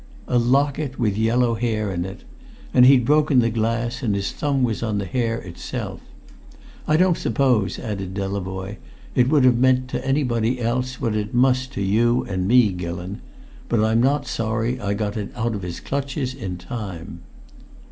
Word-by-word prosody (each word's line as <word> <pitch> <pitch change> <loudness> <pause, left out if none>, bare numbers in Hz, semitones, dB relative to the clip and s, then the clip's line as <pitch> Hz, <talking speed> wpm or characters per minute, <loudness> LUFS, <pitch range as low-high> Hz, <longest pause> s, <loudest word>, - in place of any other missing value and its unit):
"A 125 - +2
locket 135 +3 +1
with 105 -5 0
yellow 115 +2 +2
hair 110 -3 -1
in 85 0 -2
it. 95 +1 -9 0.5
And 125 -1 +7
he'd 130 -3 +6
broken 150 0 +3
the 115 -2 +4
glass, 115 +2 -1
and 110 -6 0
his 100 -1 -2
thumb 140 -3 0
was 115 -4 0
on 110 -3 -1
the 100 - -2
hair 115 +2 -1
itself! 90 -2 -6 0.9
I 155 - +4
don't 180 0 +3
suppose," 115 -6 +1
added 95 -4 -5
Delavoye, 95 0 -4 0.4
"it 125 0 +3
would 150 -3 +4
have 125 -2 +5
meant 130 0 +3
to - - -3
anybody 125 -3 0
else 125 +2 -1
what 110 -2 -1
it 105 +1 -3
must 130 +1 +2
to 100 - -2
you 120 +5 +2
and 95 -1 -2
me, 120 -2 +5
Gillon; 90 +2 -5 0.5
but 115 -2 +2
I'm 110 +1 +3
not 140 +4 +2
sorry 115 +2 -1
I 100 0 -1
got 105 0 -2
it 105 -2 -4
out 115 -1 -1
of 100 - -4
his 90 -1 -5
clutches 135 -1 -3
in 90 -2 -5
time." 90 -2 -7
115 Hz, 180 wpm, -22 LUFS, 100-130 Hz, 0.9 s, And